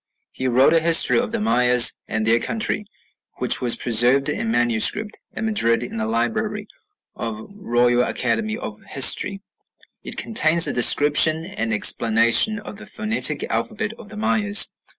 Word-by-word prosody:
He 130 - -6
wrote 130 +5 +2
a 165 - +3
history 165 +5 +4
of 240 -2 -4
the 230 - -3
Mayas 125 - +3
and 110 -1 -3
their 115 +1 +2
country, 215 - -2 0.5
which - - +2
was 120 -2 +1
preserved 125 +4 +2
in 110 - -4
manuscript 120 - 0 0.2
at - - -5
Madrid 125 - 0
in 120 - -8
the 110 0 -3
library 205 - -3 0.5
of 115 -2 -6
the 110 - -13
Royal 120 - -1
Academy 220 - -3
of - - -10
History.... 195 -1 +3 0.6
It - - -10
contains 170 -6 +2
a - - -2
description 150 +5 +3
and 115 -8 -5
explanation 115 - +2
of 205 0 -10
the 215 +1 -10
phonetic 215 +1 -2
alphabet 215 -1 -4
of 210 - -14
the 215 - -12
Mayas. 210 -1 +1
155 Hz, 155 wpm, -19 LUFS, -, 0.6 s, history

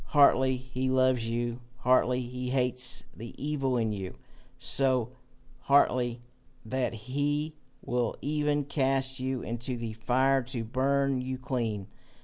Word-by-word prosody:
Heartily 130 -3 +5
he 130 +1 -3
loves 130 -3 +3
you, 120 +1 -2 0.2
heartily 125 0 +3
he 125 +1 -4
hates 125 -1 0
the 115 +1 -9
evil 135 -3 0
in 110 -2 +1
you 95 -2 -5 0.4
so 130 -1 +1 0.5
heartily 125 -3 +3 0.4
that 130 +3 -1
he 145 +7 -1 0.3
will 120 -2 0
even 150 0 0
cast 135 -1 0
you 130 0 -2
into 120 +2 -3
the 115 -2 -4
fire 130 +4 +2
to 125 -2 -4
burn 135 +2 +1
you 130 +1 -3
clean. 120 -7 -2
130 Hz, 130 wpm, -29 LUFS, 120-135 Hz, 0.5 s, Heartily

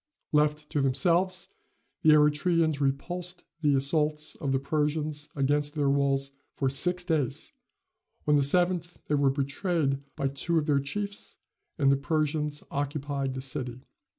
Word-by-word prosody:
Left 150 0 +2
to 145 - +1
themselves, 175 +7 +2 0.5
the 155 - +6
Eretrians 150 +1 +3
repulsed 175 +6 -2 0.2
the 145 -3 +3
assaults 150 +2 +1
of 140 -4 -2
the 135 - +3
Persians 150 +1 -1
against 145 +1 +1
their 145 -2 +2
walls 140 -1 +1 0.2
for 135 -2 0
six 180 +6 +1
days; 155 -8 -1 0.7
on 150 - +4
the 145 - +5
seventh 175 +3 +2
they - - +1
were 140 -1 +3
betrayed 140 +1 0 0.2
by 135 - 0
two 165 +5 -1
of 155 - +1
their 145 -2 +3
chiefs, 200 +9 -4 0.4
and 140 -2 +4
the 140 - +3
Persians 150 0 -1
occupied 140 -1 -2
the 130 - -4
city. 130 -2 -3
150 Hz, 145 wpm, -28 LUFS, 140-160 Hz, 0.7 s, the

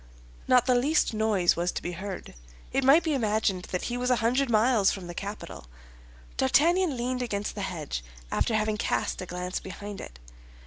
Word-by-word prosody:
Not 250 -1 +5
the 255 - +3
least 275 +2 +2
noise 215 -5 +2
was 175 +1 0
to - - -3
be 175 - -3
heard; 190 +2 -7 0.4
it 270 - +1
might 280 +6 +6
be 315 - 0
imagined 215 -7 0
that 180 - -3
he 245 - -2
was 250 0 -1
a 250 - +5
hundred 245 +4 +1
miles 220 -2 +4
from 190 -3 -6
the 175 - -7
capital. 200 - -7 0.7
D'Artagnan 330 - +3
leaned 250 +1 -2
against 205 -4 -2
the 205 - -5
hedge, 155 - -4 0.3
after 225 - +1
having 215 0 0
cast - - -1
a 185 - -6
glance 180 +1 -4
behind 200 +1 -8
it. - - -10
215 Hz, 185 wpm, -27 LUFS, 185-250 Hz, 0.7 s, might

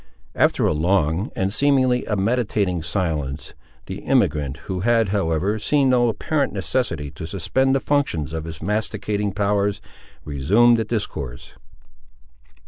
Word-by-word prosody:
After - - +2
a - - +2
long, 80 +3 +1
and, 95 +1 -1
seemingly, 130 -2 +2
a 105 - -1
meditating 100 -4 0
silence, 80 -6 -3 0.3
the - - -7
emigrant, 70 -2 +1
who 95 -2 -3
had, 115 +1 +2
however, 95 +1 0
seen 140 +3 +2
no 120 -1 +4
apparent 140 +7 -1
necessity 90 - -2
to 80 - -7
suspend 130 +10 +1
the - - +2
functions 130 - -1
of 80 -1 -4
his 80 -1 -8
masticating 105 0 -1
powers, 100 0 0 0.5
resumed 100 - +3
the 110 - -1
discourse. 80 - -5
100 Hz, 135 wpm, -22 LUFS, 80-120 Hz, 0.5 s, no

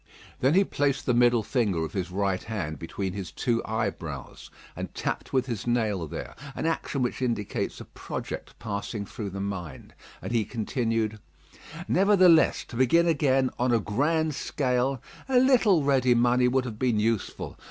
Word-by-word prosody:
Then 135 +5 +3
he 195 - +6
placed 145 -6 -1
the 125 - +2
middle 120 -1 +4
finger 105 -9 0
of - - -8
his 95 -2 -2
right 95 0 -1
hand 90 -9 -4
between 95 +3 -4
his 95 -3 -5
two 120 -2 0
eyebrows, 95 - -4 0.3
and - - -5
tapped - - -3
with 130 -2 +2
his 120 -3 -4
nail 110 -8 0
there, - - -7 0.2
an - - -3
action 155 -4 -1
which 125 - -2
indicates 115 -5 -2
a - - -8
project - - -7
passing 105 0 -4
through 105 0 -6
the 100 +1 -6
mind, 95 -8 -6 0.3
and - - -6
he 115 -2 +2
continued: 115 -1 -2 0.7
"Nevertheless, 185 -4 +5
to - - -8
begin 130 +8 +4
again, 135 -5 +2
on 125 +1 +2
a 115 - +4
grand 150 +9 0
scale, 130 -3 0 0.3
a 260 - +3
little 240 - +5
ready 130 -3 +3
money 125 +1 +3
would 130 +1 +1
have 110 -3 -6
been 120 -4 +2
useful. 110 -1 -2
120 Hz, 165 wpm, -27 LUFS, 105-135 Hz, 0.7 s, he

